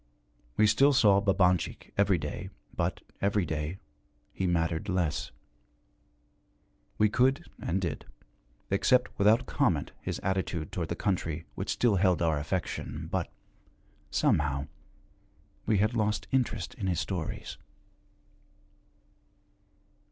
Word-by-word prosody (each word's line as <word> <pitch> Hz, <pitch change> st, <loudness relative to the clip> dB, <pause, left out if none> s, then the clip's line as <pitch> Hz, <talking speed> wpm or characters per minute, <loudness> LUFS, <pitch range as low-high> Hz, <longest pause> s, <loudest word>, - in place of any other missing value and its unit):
We 110 Hz, -, +6 dB
still 135 Hz, +7 st, +5 dB
saw 100 Hz, -6 st, +5 dB
Babanchik 95 Hz, -3 st, +1 dB
every 100 Hz, -2 st, +3 dB
day, 75 Hz, -2 st, -5 dB, 0.3 s
but, -, -, -1 dB, 0.2 s
every 100 Hz, -1 st, +2 dB
day, 80 Hz, +2 st, -3 dB, 0.6 s
he 95 Hz, -, -1 dB
mattered 85 Hz, 0 st, 0 dB
less. 90 Hz, -6 st, 0 dB, 1.7 s
We 105 Hz, -, +5 dB
could, 130 Hz, +9 st, +2 dB, 0.2 s
and 90 Hz, +3 st, 0 dB
did, 85 Hz, -5 st, -4 dB, 0.6 s
accept 125 Hz, +6 st, +3 dB
without 110 Hz, +5 st, +5 dB
comment 100 Hz, -, +1 dB
his -, -, -3 dB
attitude 95 Hz, -4 st, -1 dB
toward 85 Hz, -3 st, -3 dB
the 85 Hz, -, -1 dB
country 85 Hz, -5 st, -2 dB
which -, -, -5 dB
still 115 Hz, -5 st, +2 dB
held 90 Hz, -2 st, +3 dB
our 80 Hz, -3 st, +2 dB
affection, 85 Hz, +5 st, -3 dB
but, -, -, -1 dB, 0.8 s
somehow, 70 Hz, -2 st, +1 dB, 1.0 s
we 110 Hz, -, +3 dB
had 105 Hz, +4 st, +2 dB
lost 105 Hz, -2 st, 0 dB
interest 120 Hz, -8 st, 0 dB
in 100 Hz, -5 st, -4 dB
his 90 Hz, -3 st, +1 dB
stories. 85 Hz, -1 st, -4 dB
95 Hz, 115 wpm, -29 LUFS, 85-105 Hz, 1.7 s, We